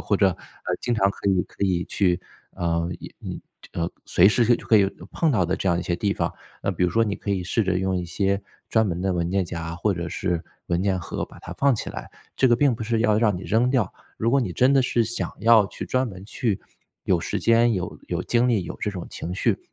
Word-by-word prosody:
或 100 - +1
者， 100 0 +4
呃， 95 - -6 0.4
经 120 - 0
常 100 -2 +3
可 100 - -3
以 95 -2 +2
可 - - -18
以 90 -2 0
去 90 -2 +1 0.3
呃， 85 -1 -1 0.9
呃， 85 - -1
呃， 85 - -1 0.2
随 90 - +5
时 110 +4 +4
就 - - -12
可 110 - +4
以 100 - +4 0.3
碰 165 - +2
到 105 -9 +2
的 85 - 0
这 95 - -1
样 85 - +2
一 90 - -2
些 85 - -1
地 100 +3 0
方。 - - -1 0.3
那 - - +1
比 - - -2
如 90 - +4
说 115 +6 +2
你 100 -2 -1
可 100 - -5
以 95 -3 0
试 110 +4 +1
着 95 -1 +1
用 95 0 0
一 90 -1 -2
些 100 +3 0 0.3
专 110 -1 +3
门 90 -1 -2
的 95 -1 +1
文 85 -1 -1
件 95 -1 +1
夹 85 -1 -5
或 105 +4 +1
者 85 -2 -4
是 85 -1 -1 0.3
文 85 +1 +1
件 95 -2 +1
盒 85 - -4
把 - - -15
它 - - -8
放 140 -2 +3
起 - - -4
来， - - -8 0.3
这 130 - +4
个 120 - +5
并 140 -2 +3
不 110 - -6
是 115 0 0
要 110 -2 +3
让 105 -5 +2
你 90 - -7
扔 115 +5 +2
掉， 125 -7 +1 0.2
如 115 - +1
果 140 - +4
你 115 - -2
真 130 +2 +4
的 135 - +5
是 120 -2 +2
想 115 +2 -3
要 110 -2 +6
去 - - -7
专 130 -1 0
门 95 -1 -10
去 110 -1 -2 0.4
有 - - +3
时 - - -2
间、 115 0 +4
有 90 - -4
有 - - -1
精 120 +1 +2
力、 110 -6 +2
有 - - -6
这 - - -1
种 90 -4 -6
情 90 +2 -5
绪， - - +1
100 Hz, 275 characters per minute, -24 LUFS, 90-115 Hz, 0.9 s, 要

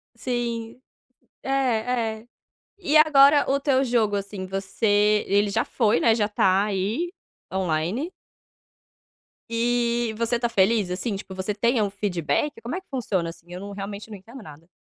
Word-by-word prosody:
Sim. 235 -1 -3 0.6
É, - - -6 0.7
é. 230 - -22 0.5
E 345 -6 +2
agora 290 -2 +6
o 275 +1 +2
teu 275 -2 +2
jogo, 230 -5 +1
assim, 200 -1 -4
você, 205 +2 +1
ele 205 +1 +2
já 200 - +1
foi, 215 -9 +1
né, 225 +6 +4
já 210 -3 +1
tá 195 -2 +2
aí 215 - -2 0.4
online. 185 - -1 1.4
E, 235 0 +1
e - - -8
você 230 +2 -1
tá 235 - +1
feliz, 205 -2 +2
assim, 195 +4 -2
tipo, 195 -1 -8
você 190 +2 -2
tem 235 +4 +1
a - - +3
um 205 - -1
feedback? 200 - -2
Como 235 +7 -4
é 375 - -4
que - - -41
funciona, 200 - -2
assim? 175 +1 -14
Eu 180 - -6
não 200 +1 -8
realmente 200 +2 -7
não 210 - -8
entendo 235 +7 -12
nada. 160 -3 -13
215 Hz, 165 wpm, -24 LUFS, 195-240 Hz, 1.4 s, agora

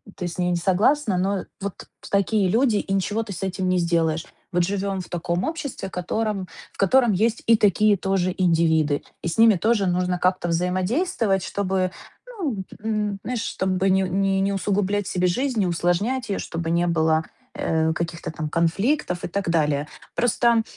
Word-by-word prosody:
ты 180 - -4
с 170 - -9
ней 180 0 +1
не 175 - +1
согласна, 200 - +2
но 195 +1 0 0.2
вот 200 -1 -6 0.2
такие 200 0 +2
люди, 230 +1 +3
и 195 -1 -2
ничего 205 +3 0
ты 205 - -7
с 185 - -6
этим 190 0 -2
не 180 0 +2
сделаешь. 165 -1 +1 0.3
Вот 175 0 +3
живем 195 +1 -2
в - - -11
таком 175 +1 -2
обществе, 295 -10 -4
котором, 195 +2 -2 0.3
в - - -22
котором 235 +4 +4
есть 220 +4 +1
и 230 - +6
такие 210 0 +4
тоже 185 -1 0
индивиды, 160 -4 +2 0.2
и - - -3
с 165 - -3
ними 225 -2 +7
тоже 210 +1 +1
нужно 180 0 0
как-то 185 -1 +1
взаимодействовать, 190 - 0
чтобы, 190 -2 -1 0.4
ну, 295 - -3
п - - -13
м, 210 -2 -1
знаешь, 245 -2 -2
чтобы 190 -3 0
не 190 0 +3
не 195 +1 +1
не 200 +1 +1
усугублять 200 0 0
себе 180 -1 +1
жизнь, 250 +6 0
не 190 - +2
усложнять 175 +9 0
ее, 195 - -1
чтобы 165 -1 -4
не 170 +1 +2
было, 160 -1 +2 0.3
э, 160 0 +1
каких-то 170 -1 -4
там 155 -2 -4
конфликтов 180 - 0
и - - -2
так 185 0 -2
далее. 150 -3 +1 0.3
Просто, 235 -1 +3
190 Hz, 180 wpm, -23 LUFS, 175-210 Hz, 0.4 s, ними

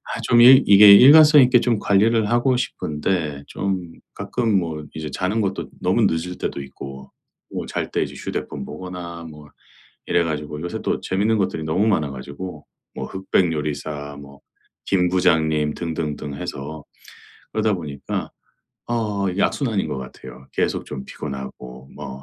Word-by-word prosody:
아 - - -4
좀 120 - +4
일 130 +2 +9
이게 100 0 +9
일관성 150 +6 +9
있게 125 0 +5
좀 120 -4 +1
관리를 105 +2 +2
하고 120 +2 +2
싶은데 75 - -2
좀 95 -1 -2 0.3
가끔 115 -5 -1
뭐 80 -4 -4
이제 80 -1 -5
자는 100 +5 -1
것도 95 -1 -3
너무 - - +2
늦을 85 +2 -1
때도 70 - -4
있고 65 0 -10 0.4
또 - - -4
잘 - - -4
때 - - 0
이제 - - -9
휴대폰 - - -5
보거나 90 -2 -8
뭐 75 -1 -13 0.6
이래 85 -1 +2
가지고 75 -1 -4
요새 85 - -4
또 - - -1
재밌는 105 +4 0
것들이 95 -4 -1
너무 90 +7 +1
많아 75 -8 +1
가지고 70 +5 -8 0.3
뭐 - - -4
흑백 95 -2 0
요리사 75 -1 -4
뭐 70 0 -14 0.5
김 90 -2 +2
부장님 80 -4 +2
등등등 75 -3 -4
해서 70 +2 -6 0.7
그러다 110 -1 +1
보니까 75 -6 -5 0.6
어 105 -4 -1
이게 95 +2 -3
악순환인 115 - 0
것 70 - -4
같아요. 65 0 -11
계속 - - -1
좀 65 -2 -7
피곤하고 65 -2 -8
뭐 70 -2 -8
85 Hz, 300 characters per minute, -21 LUFS, 75-100 Hz, 0.7 s, 일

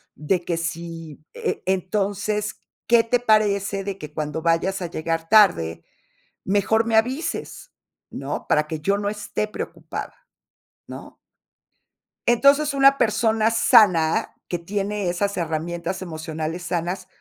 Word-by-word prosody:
de 170 +4 -1
que 170 - -1
si, 165 -2 -6
e - - -3
e 190 - +3
entonces, 205 +2 -2 0.3
¿qué 235 -1 +5
te 245 +2 +1
parece 205 -3 +2
de 195 -1 -4
que 150 -5 -9
cuando 150 +1 -3
vayas 170 +3 +1
a 175 - -2
llegar 165 0 -3
tarde, 175 - +4 0.6
mejor 205 +3 +2
me 230 - 0
avises, 260 - -1 0.4
no?, - - -5
para 150 0 +2
que 160 -1 -4
yo 200 +6 +1
no 205 0 -1
esté 210 0 -3
preocupada, - - -6 0.7
¿no? - - -10 1.1
Entonces, 280 +4 +4
una 275 0 +5
persona 220 0 +2
sana, 180 -8 +4 0.2
que 175 - -2
tiene 200 +2 -2
esas 200 +3 -1
herramientas 170 +2 -3
emocionales 160 -1 -5
sanas, 175 +2 -3
195 Hz, 130 wpm, -23 LUFS, 165-215 Hz, 1.1 s, qué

